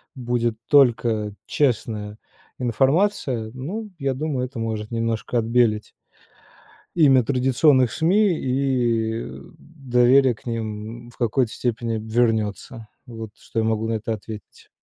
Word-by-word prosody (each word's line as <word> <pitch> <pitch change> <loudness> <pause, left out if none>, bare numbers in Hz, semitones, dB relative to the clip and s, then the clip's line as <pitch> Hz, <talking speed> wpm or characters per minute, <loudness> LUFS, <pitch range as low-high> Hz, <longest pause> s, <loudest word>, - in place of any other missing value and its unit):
будет 120 -2 -1
только 115 -6 +3
честная 110 -6 -1 0.4
информация, 130 - +1
ну, 190 - -5
я 135 -3 -1
думаю, 135 -2 -2
это 130 -1 -8
может 110 -1 -3
немножко 115 +1 -1
отбелить 115 -2 +1 1.1
имя 135 -6 +5
традиционных 130 0 +3
СМИ 185 +2 +2
и 120 -4 0 0.3
доверие 130 -3 +3
к 110 - -20
ним 115 0 -5
в 120 - -19
какой-то 120 0 +1
степени 115 -2 -2
вернётся. 110 0 -1 0.2
Вот 115 -4 -8
что 115 - -5
я 110 - +1
могу 110 0 0
на 115 - 0
это 110 +1 -3
ответить. 110 0 -10
120 Hz, 115 wpm, -23 LUFS, 110-135 Hz, 1.1 s, имя